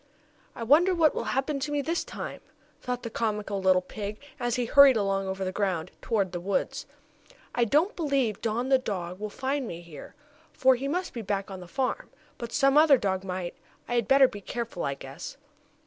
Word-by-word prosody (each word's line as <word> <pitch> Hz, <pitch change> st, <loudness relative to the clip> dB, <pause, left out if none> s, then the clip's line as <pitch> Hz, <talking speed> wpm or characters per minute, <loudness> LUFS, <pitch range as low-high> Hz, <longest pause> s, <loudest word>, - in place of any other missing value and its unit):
"I 230 Hz, -, -5 dB
wonder 330 Hz, +10 st, +5 dB
what 320 Hz, -3 st, +4 dB
will -, -, -3 dB
happen 275 Hz, +2 st, -1 dB
to 285 Hz, +2 st, -3 dB
me 290 Hz, -1 st, 0 dB
this 335 Hz, +4 st, -1 dB
time?" -, -, -7 dB, 0.4 s
thought 250 Hz, -1 st, -3 dB
the 230 Hz, -, -5 dB
comical 210 Hz, -3 st, -2 dB
little 185 Hz, -1 st, +4 dB
pig, 205 Hz, +2 st, -6 dB, 0.2 s
as 240 Hz, 0 st, 0 dB
he 250 Hz, -1 st, 0 dB
hurried 275 Hz, 0 st, +7 dB
along 195 Hz, -1 st, 0 dB
over 190 Hz, 0 st, -3 dB
the 185 Hz, -, -2 dB
ground, 185 Hz, -4 st, -1 dB
toward 200 Hz, -6 st, 0 dB
the 175 Hz, -, -4 dB
woods. 200 Hz, +9 st, -2 dB, 0.7 s
"I 240 Hz, -, +2 dB
don't 305 Hz, -, +2 dB
believe 275 Hz, -, 0 dB
Don, 235 Hz, +3 st, -1 dB
the 265 Hz, -1 st, +5 dB
dog, 185 Hz, -6 st, -4 dB
will 210 Hz, 0 st, -4 dB
find 265 Hz, +3 st, -2 dB
me 170 Hz, -3 st, -6 dB
here, 165 Hz, -4 st, -11 dB, 0.4 s
for 260 Hz, 0 st, +5 dB
he 260 Hz, +2 st, -3 dB
must 360 Hz, +5 st, -2 dB
be 235 Hz, -, -4 dB
back 200 Hz, -1 st, -3 dB
on 190 Hz, -, -6 dB
the 180 Hz, -, -10 dB
farm. 260 Hz, +7 st, -2 dB, 0.3 s
But 235 Hz, -1 st, -5 dB
some 275 Hz, +2 st, +4 dB
other 305 Hz, -3 st, +7 dB
dog 190 Hz, -4 st, -1 dB
might. 180 Hz, -2 st, -4 dB, 0.3 s
I -, -, -3 dB
had 235 Hz, -3 st, +1 dB
better 270 Hz, 0 st, +7 dB
be 205 Hz, -4 st, -9 dB
careful, 230 Hz, -3 st, -4 dB
I 140 Hz, -, -1 dB
guess." -, -, -9 dB
230 Hz, 205 wpm, -27 LUFS, 195-270 Hz, 0.7 s, hurried